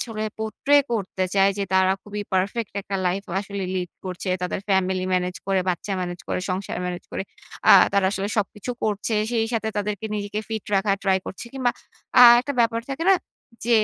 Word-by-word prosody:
আসলে 220 -3 -4 0.2
portray 275 +6 +3
করতে 190 -4 -1
চায়, 195 0 +5
যে, - - 0
তারা 190 0 +4
খুবই 210 0 -5
পারফেক্ট 200 +4 0
একটা 195 0 -3
লাইফ 190 +3 -1 0.2
আসলে 200 -1 -5
লিড 180 -2 -2
করছে। 185 +1 -5
তাদের 180 +1 -2
ফ্যামিলি 190 -1 +1
মেনেজ 180 0 -1
করে, 195 -1 +2
বাচ্চা 180 +3 -3
মেনেজ 175 -1 -4
করে, - - -1
সংসার 185 0 -3
মেনেজ 180 -1 -5
করে। - - -2 0.5
আ - - +11 0.2
তারা 200 -1 +3
আসলে 195 0 -2
সবকিছু 210 +3 -3
করছে। 215 +1 -1 0.2
সেই 225 -1 +1
সাথে 220 -1 -1
তাদেরকে 205 +1 -3
নিজেকে 205 0 -3
ফিট 220 -2 -4
রাখার 195 0 +2
ট্রাই 190 -1 +3
করছে। 190 - -7
কিংবা, 255 -2 +1 0.5
আ - - +11 0.2
একটা 285 +3 -4
ব্যাপার 230 0 +2
থাকে 280 +5 -3
না? - - +8 0.5
যে, 240 - -2
200 Hz, 185 wpm, -24 LUFS, 190-220 Hz, 0.5 s, আ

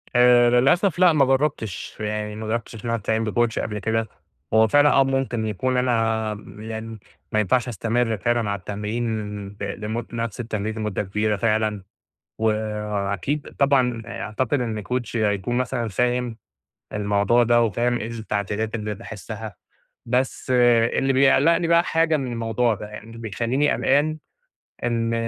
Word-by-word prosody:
آآ، 120 0 +6
للأسف 150 +9 +3
لأ، 180 -2 +6
ما 145 -3 +4
جرَّبتش، 135 -7 -1
يعني 105 0 -3
ما 110 0 -6
جرَّبتش 115 +1 -3
إن - - -8
أنا 115 - +1
أستعين 110 +1 -1
بcoach 120 -1 +1
قبل 105 -1 -3
كده. 110 +1 -1 0.5
هو 110 0 +6
فعلًا، 145 +6 +5
آه، 135 - +5
ممكن 135 -4 -1
يكون 125 +5 -1
أنا 115 -3 +1
م 105 0 -11
يعني 110 0 -6 0.3
ما 110 - +2
ينفعش 120 +4 +2
أستمرّ 115 0 0
فعلًا 115 +2 0
على 100 0 -2
التمرين 105 0 -4
ب 100 - -10
لمد 110 +3 -4
نفس 115 -2 -3
التمرين 110 -2 -3
لمُدة 105 -2 -2
كبيرة 105 +2 0
فعلًا، 110 -1 0 0.6
وأكيد 105 - -2
طبعًا 130 -4 +2
أعتقد 115 +4 -2
إن 110 -3 -3
coach 125 0 -3
هيكون 105 +1 0
مثلًا 125 -2 -1
فاهم 125 +2 0 0.6
الموضوع 105 +3 +2
ده، 120 0 +4
وفاهم 120 +2 +1
إيه 110 - -4
التعديلات 110 0 -3
اللي 105 -1 -3
باحسّها. 110 0 -8 0.5
بس 125 +2 -1
اللي 120 +2 +3
بيقلِّقني 145 +5 +4
بقى 170 0 +5
حاجة 165 -2 +2
من 130 -3 -3
الموضوع 115 0 0
ده، 105 - -8
يعني 105 0 -9
اللي 115 0 -11
بيخلّيني 115 +6 0
قلقان 150 +3 +2 0.7
إن 115 -1 0
115 Hz, 150 wpm, -23 LUFS, 105-125 Hz, 0.7 s, آآ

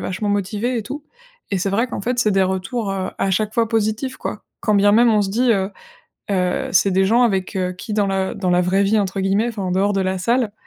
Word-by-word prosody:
vachement 190 +3 -3
motivée 205 +5 -1
et - - -3
tout». 285 +7 -7 0.5
Et 195 - 0
c'est 195 +2 -1
vrai 225 +6 +1
qu'en - - -5
fait, 245 +4 -2
c'est 215 - +2
des 195 -1 +3
retours, 190 +4 -2
heu, 190 -1 -3
à 195 - 0
chaque 215 +3 0
fois 230 -1 +1
positifs, 225 +4 -1
quoi. 210 - -6 0.2
Quand 210 - +1
bien 205 +1 +4
même, 235 +2 +5
on 210 - +3
se 195 - -2
dit, 240 +4 +2
heu 195 -2 0 0.6
heu, 180 -2 0
c'est 190 +2 +4
des 190 +1 +3
gens 230 +5 +3
avec 195 -4 0 0.2
qui, 215 - -6
dans 205 -1 +1
la 190 -1 -1
dans 190 -3 -1
la 180 0 +3
vraie 185 +2 +2
vie, 210 +2 +2
entre 195 0 -3
guillemets, 195 +5 +1
enfin 215 -4 -5
en 180 - -2
dehors 195 +2 +2
de 195 - 0
la 190 0 -1
salle, 230 +3 0
200 Hz, 255 wpm, -20 LUFS, 190-225 Hz, 0.6 s, même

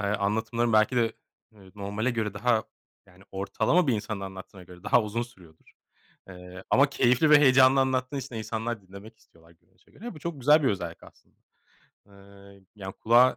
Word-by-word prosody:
anlatımların 110 +3 -1
belki 110 +3 +3
de, 115 -1 +1 0.4
eee, 95 -3 -18
normale 105 +4 -3
göre 110 -4 -3
daha, 110 +1 +1 0.4
yani 95 0 -20
ortalama 110 - 0
bir 130 - +2
insanın 105 -1 -4
anlattığına 95 -1 -9
göre 90 0 -15
daha 120 - +3
uzun 110 +3 -3
sürüyordur. 90 -10 -16 0.6
Eee, 90 0 -11
ama 140 +2 +4
keyifli 125 +4 +2
ve 150 - +8
heyecanlı 130 -1 +5
anlattığın 130 +1 -1
için 130 -2 -8
de - - -4
insanlar 110 0 -4
dinlemek 100 +4 -14
istiyorlar 85 -4 -24
görünüşe 85 0 -31
göre. 240 +3 -9
Bu 155 - -11
çok 155 -2 -6
güzel 150 +4 +5
bir 130 - +2
özellik 85 -4 -4
aslında. - - -20 0.7
Eee, 100 0 -18
yani, 95 -2 -7
kulağa 120 +3 +4
110 Hz, 170 wpm, -26 LUFS, 100-125 Hz, 0.7 s, ve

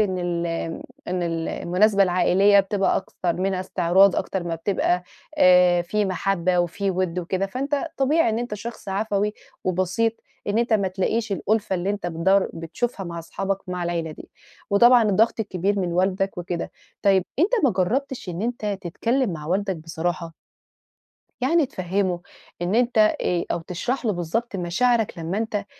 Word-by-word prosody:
إن 190 -3 +1
ال 175 -1 -1
آمم 165 0 -4 0.3
إن 180 0 -1
ال 165 -1 -2
المناسبة 195 +3 +2
العائلية 195 +2 +4
بتبقى 195 0 0
أكتر 180 -2 -2
منها 185 +1 -1
إستعراض، 185 +1 +3
أكتر 190 -2 -2
ما 170 -1 -3
بتبقى 180 +1 0 0.4
آآ 180 -1 +6
في 210 +4 0
مَحبَّة 185 -1 0
وفي 195 +3 -1
وِد 180 -1 -1
وكده، 185 +2 -1
فأنت 275 +7 -2 0.2
طبيعي 295 +4 +3
إن 220 - -1
أنت 240 -2 -3
شخص 225 +1 -8
عفوي 205 +1 0 0.3
وبسيط 185 +5 +1 0.3
إن 205 +2 +1
أنت 235 -1 +1
ما 200 -3 +3
تلاقيش 200 +3 -1
الأُلفة 205 0 0
اللي 180 +2 -1
أنت 205 -3 -3
بتدوَّر 180 +4 +2
بتشوفها 195 +6 -3
مع 170 -1 -6
أصحابك 195 +4 -3
مع 180 -1 -3
العيلة 170 -2 -2
دي، - - -12 0.4
وطبعًا 240 +4 +6
الضغط 220 +2 +2
الكبير 200 -1 -1
من 180 -3 -1
والدك 190 +1 0
وكده. 175 -1 -4 0.3
طيّب 195 -2 +4
أنت 355 +8 +3
ما 265 - +5
جرّبتش 235 +6 -1
إن 180 +3 -4
أنت 215 -4 -2
تتكلّم 230 +5 0
مع 150 -2 -7
والدك 190 +1 0
بصراحة. 165 +1 -4 1.1
يعني 295 +4 +3
تفهِّمُه 185 -3 -1 0.4
إن 180 +4 0
أنت 240 -1 +2
آآ، 180 -5 +2
أو 170 - -2
تشرَح 215 +11 -3
له 215 - +2
بالضبط 195 +6 -2
مشاعرك 215 +4 +1
لمّا 165 +5 -2
أنت 215 -2 -2
190 Hz, 160 wpm, -23 LUFS, 175-215 Hz, 1.1 s, آآ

